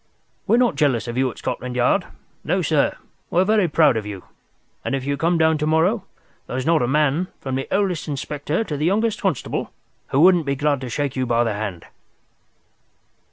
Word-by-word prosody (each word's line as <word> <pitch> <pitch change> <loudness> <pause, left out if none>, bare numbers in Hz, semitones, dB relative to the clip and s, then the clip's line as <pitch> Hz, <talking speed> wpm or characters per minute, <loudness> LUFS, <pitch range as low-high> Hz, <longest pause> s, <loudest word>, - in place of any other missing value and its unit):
We're 225 +4 +4
not 240 - +2
jealous 135 -6 +1
of 120 - -4
you 130 0 +1
at - - -10
Scotland 125 0 -4
Yard. 125 0 +2 0.4
No, - - 0
sir, - - +1 0.3
we 175 - +1
are 185 - +4
very 210 -2 +3
proud 155 -4 +4
of 110 - -2
you, 100 -2 -7 0.6
and - - -1
if 135 -1 -4
you 140 0 0
come 165 +4 +1
down 160 -1 +3
to 150 - 0
morrow, 175 +7 +2 0.4
there's 130 +1 -3
not 165 -3 +3
a 120 - +1
man, 150 +5 +1
from 130 - -5
the 135 +1 -2
oldest 190 -5 0
inspector 150 +5 -2
to 155 - -4
the 150 - -1
youngest 210 +4 +1
constable, 185 -9 -2 0.4
who 135 - 0
wouldn't 175 -3 +5
be 140 - +1
glad 145 -1 0
to 130 - -5
shake 140 +2 -2
you 130 -1 -1
by 120 0 +2
the 115 -2 -1
hand." 100 -5 -5
145 Hz, 205 wpm, -22 LUFS, 130-170 Hz, 0.6 s, wouldn't